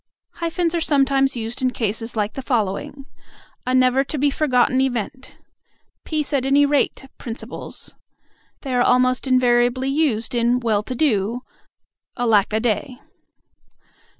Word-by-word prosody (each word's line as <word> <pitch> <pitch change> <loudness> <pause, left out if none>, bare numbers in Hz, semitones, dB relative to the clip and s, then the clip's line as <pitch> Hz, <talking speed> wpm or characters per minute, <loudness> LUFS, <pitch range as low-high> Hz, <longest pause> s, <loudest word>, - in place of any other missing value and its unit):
Hyphens 335 0 -1
are 340 - 0
sometimes 275 -2 +2
used 230 +2 -5
in 255 - +2
cases 225 -1 -3
like 210 -1 -1
the 270 - -5
following: 245 +3 -2 0.6
"A 255 - +2
never 255 +1 +4
to 300 - -5
be 285 +1 +2
forgotten 260 -3 +2
event," 260 +1 -3 0.7
"peace 305 -2 -2
at 275 -3 +1
any 280 +2 +4
rate 285 -1 0
principles." 230 -1 -8 0.7
They 270 -3 -4
are 245 - +2
almost 255 +1 +2
invariably 250 0 +2
used 270 -7 0
in 240 +1 +2
"well 220 -4 +1
to 255 +4 -6
do," 235 -4 0 0.8
"alack 225 -5 +2
a 215 - +1
day." 245 +3 -2
255 Hz, 135 wpm, -21 LUFS, 235-275 Hz, 0.8 s, never